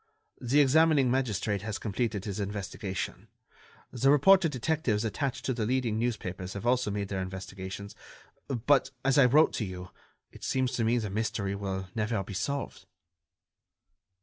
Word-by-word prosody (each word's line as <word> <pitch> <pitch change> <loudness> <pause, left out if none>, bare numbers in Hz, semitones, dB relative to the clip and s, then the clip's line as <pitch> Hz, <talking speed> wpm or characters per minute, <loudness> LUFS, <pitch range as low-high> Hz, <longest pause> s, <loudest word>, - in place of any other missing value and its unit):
The 135 +4 +4
examining 145 -2 +4
magistrate 110 -6 0
has 105 0 -4
completed 110 -1 -2
his 100 -1 -4
investigation. 100 -1 -4 0.6
The 130 +2 +2
reporter 170 +5 +6
detectives 130 -5 0
attached 135 +4 -2
to 130 - 0
the 115 -2 -2
leading 120 -3 0
newspapers 95 -6 -3
have 100 +2 -6
also 125 -2 +2
made 100 -1 -3
their 95 -2 -2
investigations. 95 +1 -7 0.5
But, 135 +2 +2 0.2
as 135 +1 +4
I 135 - +7
wrote 150 +6 +5
to - - -2
you, 90 -2 -7 0.4
it - - -14
seems 130 -1 0
to 125 -3 -1
me 115 +2 +2
the 105 -4 -2
mystery 100 -2 -1
will 95 -1 -4
never 110 -2 -1
be 100 - -8
solved." 135 +9 -3
110 Hz, 150 wpm, -29 LUFS, 100-130 Hz, 0.6 s, I